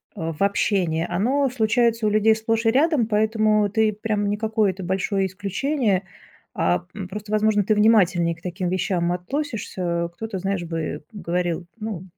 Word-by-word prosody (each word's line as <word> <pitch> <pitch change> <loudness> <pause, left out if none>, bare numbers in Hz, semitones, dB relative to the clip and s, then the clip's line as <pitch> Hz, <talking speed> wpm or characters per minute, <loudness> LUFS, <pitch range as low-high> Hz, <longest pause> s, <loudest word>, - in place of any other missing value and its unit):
э, 165 0 -3
в 155 - -10
общении 185 -5 +1
оно 260 +10 +1
случается 230 -1 +1
у - - +3
людей 215 +1 +4
сплошь 225 +1 -1
и 225 - +5
рядом, 285 -1 +3
поэтому 215 -1 +2
ты 220 +1 +2
прям 210 -1 -2
не 205 - -1
какое-то 215 -3 0
большое 190 +2 0
исключение, 200 +3 -1 0.5
а, 90 - 0
м, 195 -3 -6
просто, 210 +2 -7
возможно, 215 -1 +3
ты 215 +2 +2
внимательнее 185 -6 +3
к 165 - -21
таким 180 +1 -3
вещам 180 -1 0
относишься. 180 - -3
Кто-то, 220 -1 -5
знаешь, 195 -1 -2
бы 165 -3 -4
говорил: 175 -3 -2
"Ну, 210 -5 -5
205 Hz, 160 wpm, -23 LUFS, 180-220 Hz, 0.5 s, и